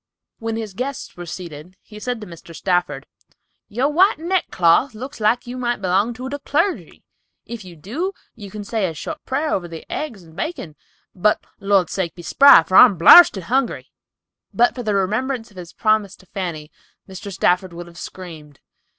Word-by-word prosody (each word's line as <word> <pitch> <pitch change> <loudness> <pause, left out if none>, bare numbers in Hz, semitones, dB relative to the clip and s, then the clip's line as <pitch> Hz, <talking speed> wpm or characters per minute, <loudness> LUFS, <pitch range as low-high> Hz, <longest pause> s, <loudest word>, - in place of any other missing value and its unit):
When 225 0 -3
his 220 -3 -5
guests 255 +5 -5
were 175 -1 -9
seated, 170 +1 -9
he 210 -1 -13
said 245 +1 -3
to - - -7
Mr. 170 -1 -12
Stafford, 165 -6 -1 0.6
"Your 245 +6 0
white 355 +7 +3
neck 350 +3 -1
cloth 180 +9 +3
looks 255 +3 -8
like 220 +3 +1
you 245 +1 -7
might 240 -2 -1
belong 195 +5 0
to 255 +2 -6
the 285 +2 -5
clergy. 330 +7 -2 0.4
If 235 -3 -8
you 180 -2 -12
do, 245 - -4 0.2
you 205 -4 -11
can 210 +2 -7
say 210 -1 -1
a 165 - -6
short 310 - -7
prayer 290 +4 -1
over 175 -2 -2
the 165 -1 -10
eggs 235 -12 -5
and 160 -1 -18
bacon, 195 - -5 0.4
but 210 +3 +1
Lord's 195 -3 +1
sake 185 -4 -3
be 175 - -11
spry, 275 - +7
for 185 - +2
I'm 220 -7 +8
blarsted 190 - +8
hungry!" 255 +6 -1 0.6
But 240 +1 +3
for 250 - -6
the 215 -3 -1
remembrance 225 +5 -1
of 195 - -19
his 175 -2 -9
promise 215 -3 0
to - - -21
Fanny, 170 -6 -6 0.4
Mr. 190 +1 -8
Stafford 180 0 +1
would 170 +1 -8
have 170 0 -14
screamed. 155 -6 -10
205 Hz, 185 wpm, -20 LUFS, 175-250 Hz, 0.6 s, I'm